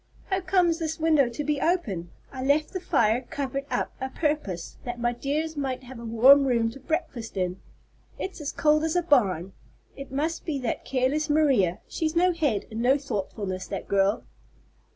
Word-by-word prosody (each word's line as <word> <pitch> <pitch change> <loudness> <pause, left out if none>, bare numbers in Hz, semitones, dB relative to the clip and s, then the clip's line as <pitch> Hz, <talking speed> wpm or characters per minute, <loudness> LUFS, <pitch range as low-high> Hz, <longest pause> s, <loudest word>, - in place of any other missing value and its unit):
"How 380 0 +1
comes 360 -2 +2
this 320 -1 -3
window 310 -5 +4
to 240 +5 -4
be 295 -1 -1
open? 210 - 0 0.2
I 260 -1 -5
left 290 +3 +2
the 370 - -2
fire 235 -9 +2
covered 275 -1 -3
up - - -1
a 265 - -2
purpose, 265 - -2
that 245 -1 -5
my 240 0 +1
dears 300 +6 -2
might 265 -3 -3
have 250 -1 -10
a 235 - -8
warm 260 +5 +6
room 230 -3 +2
to 275 - -11
breakfast 270 - -3
in. 185 0 -2 0.6
It's 380 -4 -5
as 290 - -3
cold 305 0 +3
as 320 +1 0
a 355 - +2
barn. 195 - +2 0.4
It 275 -1 -9
must 310 +5 -2
be 310 -4 -2
that 240 - -3
careless 275 +4 0
Maria. 270 - +3
She's 315 0 -2
no 360 +1 +4
head 285 - 0
and 220 +1 -3
no 260 +3 +4
thoughtfulness, 195 -6 -4
that 195 - -5
girl." 200 +2 +2
275 Hz, 185 wpm, -26 LUFS, 230-310 Hz, 0.6 s, warm